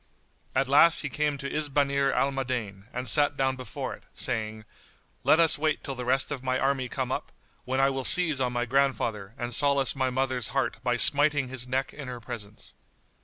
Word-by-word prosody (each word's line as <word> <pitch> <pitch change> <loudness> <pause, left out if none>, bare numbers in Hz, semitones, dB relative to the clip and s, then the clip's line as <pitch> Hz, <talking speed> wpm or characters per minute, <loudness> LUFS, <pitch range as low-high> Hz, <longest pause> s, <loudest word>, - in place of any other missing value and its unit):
At 135 0 +1
last 150 +5 +5
he 145 - -4
came 150 +1 -1
to 140 0 -6
Isbanir 140 -2 0
al 140 - +1
Madain 120 -7 -4
and 125 +1 -5
sat 145 +4 +3
down 130 -1 0
before 130 -4 -6
it, - - -12
saying, 110 -1 -2 0.6
"Let 155 - +4
us 165 -3 +4
wait 155 0 -1
till 135 - -4
the 125 -1 -6
rest 135 +3 +1
of 135 -3 -5
my 130 0 0
army 135 -1 -1
come 130 -1 -3
up, - - -4 0.3
when 130 +1 -2
I 135 0 +3
will 135 0 -4
seize 160 -3 +6
on 125 -1 0
my 120 0 -2
grandfather 120 -6 -1
and 120 0 -4
solace 140 +1 +3
my 130 -1 0
mother's 130 -2 -1
heart 135 - -1
by 125 -1 0
smiting 145 0 +3
his 125 -1 -4
neck 130 +1 -2
in 140 -3 -9
her 125 -1 -6
presence." 110 -2 -9
130 Hz, 200 wpm, -27 LUFS, 125-140 Hz, 0.6 s, seize